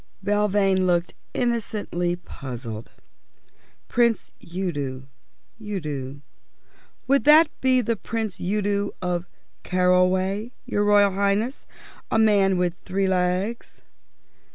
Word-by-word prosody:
Belvane 200 -2 +2
looked 170 -2 +1 0.2
innocently 210 -7 -1
puzzled. 120 -9 -8 1.0
"Prince 235 -2 +1
Udo 145 -8 -4 0.5
Udo 150 -10 -5 0.8
would 275 +1 +3
that 305 +2 +7
be 255 -1 +3
Prince 225 -2 -3
Udo 200 +1 -1
of 175 -1 -2 0.4
Carroway, 185 +4 +2
your 205 - 0
Royal 205 -1 +5
Highness? 200 +6 -1 0.4
A - - -4
tall 220 - +5
man 195 -3 +3
with 180 -1 +1
three 195 +1 -1
legs?" 185 +4 -1
195 Hz, 95 wpm, -24 LUFS, 175-210 Hz, 1.0 s, that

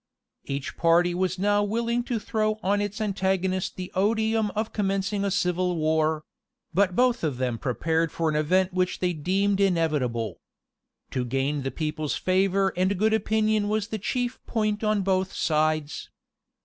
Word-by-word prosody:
Each 140 0 -4
party 175 +1 +3
was 185 0 -1
now 205 +2 +2
willing 235 +3 0
to 240 - -1
throw 215 0 -1
on 205 +2 +2
its 205 +1 -3
antagonist 190 -3 -1
the 185 -1 -6
odium 220 +2 +1
of 215 +1 -2
commencing 200 0 -1
a 200 - +1
civil 180 -1 0
war; 155 -1 +1 0.5
but 185 0 +2
both 250 -4 +2
of 145 -6 -1
them 125 -3 -1
prepared 160 +5 0
for 165 - -1
an 155 - 0
event 180 +5 +2
which 180 0 0
they 180 -1 0
deemed 195 +5 0
inevitable. 150 - 0 0.7
To 130 - -1
gain 135 +4 -1
the 135 - -2
people's 155 0 -3
favor 190 +1 +1
and 185 +2 +1
good 220 +3 +2
opinion 215 -1 +1
was 215 0 -1
the 220 - -3
chief 245 +4 -2
point 215 -1 -1
on 215 -2 +1
both 190 0 0
sides. 155 -1 0
185 Hz, 160 wpm, -26 LUFS, 160-210 Hz, 0.7 s, party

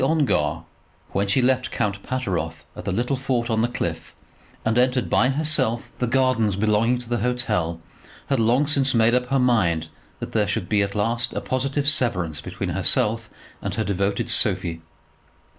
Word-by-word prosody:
Lady 135 - +2
Ongar, 85 - +1 0.5
when 100 +1 0
she 125 +6 +2
left 130 0 +2
Count 100 -1 -2
Pateroff 120 -9 -3
at - - -8
the - - -1
little 120 +8 0
fort 125 -3 -1
on 110 0 +2
the 120 - +2
cliff 120 - -4 0.5
and 110 0 +1
entered 125 0 +1
by 125 - +4
herself 135 -5 +2
the 125 - 0
gardens 120 -5 +2
belonging 110 +4 +2
to 120 -1 -8
the 120 0 -1
hotel, 105 -9 -1 0.5
had 135 -3 0
long 120 +6 +3
since 140 -3 +2
made 115 +1 +4
up 125 0 +1
her 135 +2 +1
mind 90 -11 +2 0.3
that - - -6
there - - +1
should - - -1
at 100 -1 +1
last 115 +3 0
be - - -7
a - - -1
positive 135 +2 -1
severance 90 - +1
between - - -5
herself 115 +1 0 0.3
and - - -3
her 110 - 0
devoted 100 0 -1
Sophie. 85 -1 0
120 Hz, 175 wpm, -23 LUFS, 100-130 Hz, 0.5 s, by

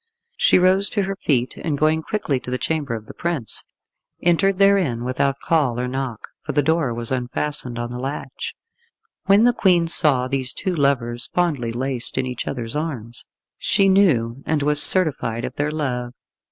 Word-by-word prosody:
She - - +4
rose 185 +2 +3
to 205 - -1
her 195 +1 -3
feet, 130 -9 -1
and 150 -4 -3
going 155 +2 +1
quickly 155 - -2
to 125 - -9
the 125 - -1
chamber 145 -4 -2
of 110 -1 -8
the - - -11
prince, 165 - 0 0.6
entered 185 +3 +2
therein 190 -12 +2
without 130 +2 -1
call 140 -8 0
or 125 - -2
knock, 130 -3 -5
for 150 - -4
the 145 - +2
door 160 -4 +1
was 115 +1 -2
unfastened 130 0 -3
on 120 0 -4
the 125 - -6
latch. 135 +3 -6 0.7
When 200 +3 +5
the 245 0 +4
Queen 175 -6 +2
saw 140 -6 +3
these 130 0 -2
two 185 - -3
lovers 130 -6 -1
fondly 150 -10 0
laced 125 +1 0
in 130 - 0
each 125 -1 -5
other's 120 -2 -5
arms, 125 -7 -5 0.3
she 195 - +2
knew 135 - +2
and 155 -2 0
was 150 0 +3
certified 140 -12 +4
of - - -7
their 145 +1 0
love. 125 -5 -3
140 Hz, 180 wpm, -21 LUFS, 125-170 Hz, 0.7 s, When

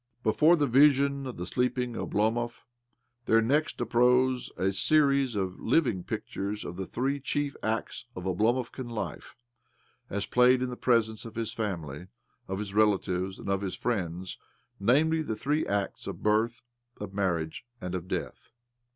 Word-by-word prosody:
Before 155 +10 +5
the 150 -4 +2
vision 140 +1 +4
of 125 - -7
the 90 - -4
sleeping 125 +3 -1
Oblomov 115 +2 -1 0.6
there 115 - +5
next 145 +8 +1
uprose 125 +1 +2
a 95 +1 +1
series 140 +1 +3
of 95 -2 -2
living 115 - +1
pictures 105 0 -4
of 85 - -6
the 95 0 -5
three 135 +3 -1
chief 145 +1 -2
acts 110 +2 -2
of 90 - -6
Oblomovkan 120 +7 0
life, 115 -3 -5 0.7
as 100 +1 -2
played 125 +2 +4
in 125 - -2
the - - -4
presence 115 -3 +1
of 115 -1 -9
his 115 -1 -2
family, 90 -7 -4 0.4
of 95 - -3
his 100 -1 -5
relatives, 95 -3 +1
and - - -9
of 100 0 0
his 95 -2 -3
friends— 95 -5 -3 0.4
namely, 150 +10 +3
the 115 -8 -3
three 150 +8 0
acts 100 -1 -2
of - - -6
birth, 110 +3 +1 0.4
of 105 -2 -6
marriage, 85 -4 -1 0.2
and 90 -4 -5
of 90 -1 -4
death. - - -5
115 Hz, 155 wpm, -29 LUFS, 95-130 Hz, 0.7 s, Before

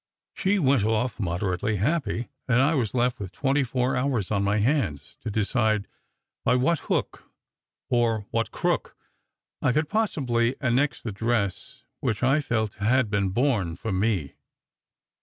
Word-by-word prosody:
She 200 +1 +1
went 135 - +3
off 110 +3 0
moderately 90 +2 -1
happy; 125 - -1 0.2
and 125 -1 +3
I 140 +5 +4
was 125 -6 -1
left 125 0 +1
with 95 -3 -6
twenty 140 +7 +1
four 130 +1 0
hours 125 -7 0
on 100 -2 +1
my 100 +1 +2
hands 110 - 0
to 115 - -4
decide 110 0 +1 0.6
by 125 - +3
what 150 +6 +2
hook, - - -3 0.6
or 115 -3 +1
what 115 -1 0
crook, - - -1 0.6
I 125 - +3
could 150 +3 0
possibly 130 - +1
annex 135 +2 +1
the 115 - -3
dress 105 -2 -2 0.2
which 110 - -1
I 135 +4 +4
felt 110 -6 -1
had 120 0 +2
been 100 -2 +1
born 105 - +1
for 110 +5 -4
me. 95 -6 0
115 Hz, 150 wpm, -26 LUFS, 105-130 Hz, 0.6 s, I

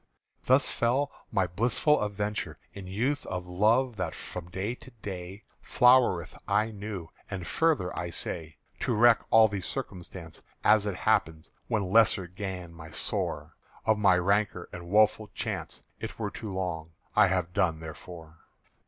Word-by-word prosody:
Thus 130 +2 +4
fell 130 +5 +1 0.2
my 95 -4 +2
blissful 120 - +2
aventure 105 0 -3 0.2
In 100 -2 -8
youth 125 +10 -1
of 90 0 -4
love 110 +7 +2
that 90 -4 -3
from 90 -1 -7
day 95 +6 -3
to 125 - -13
day 95 +1 -6 0.2
Flowereth 125 -9 +4
aye 105 +3 +2
new, 100 -5 -6 0.2
and 95 -3 -5
further, 155 - +1
I 85 0 -3
say._ 80 -1 -3 0.3
"_To 115 -4 0
reck 120 0 +6
all 110 0 +7
the 100 -2 -4
circumstance 90 - -6 0.2
As 105 -1 +5
it 100 - -2
happed 80 -3 0 0.2
when 105 -6 -1
lessen 95 -5 +4
gan 95 -4 -5
my 80 -1 -11
sore, - - -2 0.3
Of 110 -1 +3
my 95 -3 +5
rancor 95 -1 +1
and 85 0 -8
woeful 105 +1 +4
chance, - - -4 0.2
It - - -6
were - - -3
too 110 - -6
long 85 -4 -4 0.2
I 105 -1 +6
have 90 -2 -1
done 85 -4 +1
therefor. 80 0 -10
100 Hz, 155 wpm, -28 LUFS, 90-110 Hz, 0.3 s, all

